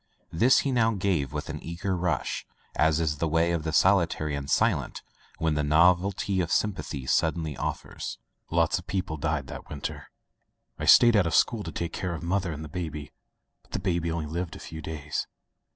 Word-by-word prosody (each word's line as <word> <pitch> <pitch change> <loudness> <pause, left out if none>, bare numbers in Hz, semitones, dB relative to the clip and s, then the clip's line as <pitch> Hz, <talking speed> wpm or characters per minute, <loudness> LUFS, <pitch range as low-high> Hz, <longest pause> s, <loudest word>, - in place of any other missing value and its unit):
This 120 +11 +4
he 140 - -1
now 115 -3 +2
gave 90 -9 0
with - - -4
an - - -6
eager 85 +3 -3
rush, 85 -8 -1 0.3
as 80 0 +3
is 75 -3 -1
the 80 - +1
way 80 +2 +2
of 85 -2 0
the 80 0 -3
solitary 85 -4 +3
and 70 0 -5
silent - - +1 0.3
when 80 -1 +1
the 75 0 0
novelty 90 +5 +3
of 85 - -3
sympathy 85 -10 -1
suddenly 80 +1 +1
offers. - - -5 0.3
"Lots 85 +3 +2
of 90 - -14
people 90 -5 -2
died 80 -2 -1
that - - -9
winter. 75 -2 -5 0.7
I - - -2
stayed 120 -1 +7
out 100 -5 +4
of 80 - 0
school 115 -3 +3
to - - -6
take 85 -1 -4
care 90 -2 -3
of 80 - -7
mother 90 0 0
and 80 +1 -6
the - - -7
baby, 75 -4 -5 0.5
but - - -24
the - - 0
baby 85 -3 -1
only 80 -1 -2
lived 85 +3 -4
a - - -9
few 80 -1 -8
days. 75 -1 -4
85 Hz, 195 wpm, -27 LUFS, 75-90 Hz, 0.7 s, stayed